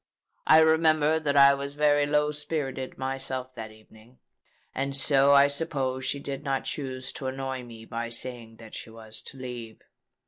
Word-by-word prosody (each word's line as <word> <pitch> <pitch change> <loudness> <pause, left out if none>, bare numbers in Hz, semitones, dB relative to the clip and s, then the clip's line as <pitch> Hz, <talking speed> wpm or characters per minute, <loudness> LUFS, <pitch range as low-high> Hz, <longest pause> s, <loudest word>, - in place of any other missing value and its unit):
I 155 - +8
remember 160 -1 +4
that 145 -2 0
I 140 0 +8
was 140 +1 -5
very 145 -1 +3
low 150 0 +2
spirited 145 -3 -4
myself 130 -1 -4
that 110 -3 -7
evening; 110 +3 -19 0.6
and 135 +1 -2
so 140 0 +4
I 140 0 +7
suppose 135 -3 -2
she 140 - -1
did 140 0 -6
not 135 -2 -1
choose 130 -3 -4
to 135 - -6
annoy 130 0 -4
me 115 -2 -11
by 115 0 -4
saying 115 -1 -4
that 110 -1 -14
she - - -7
was 110 -1 -10
to 135 - -11
leave. 120 -4 -8
135 Hz, 170 wpm, -27 LUFS, 125-145 Hz, 0.6 s, I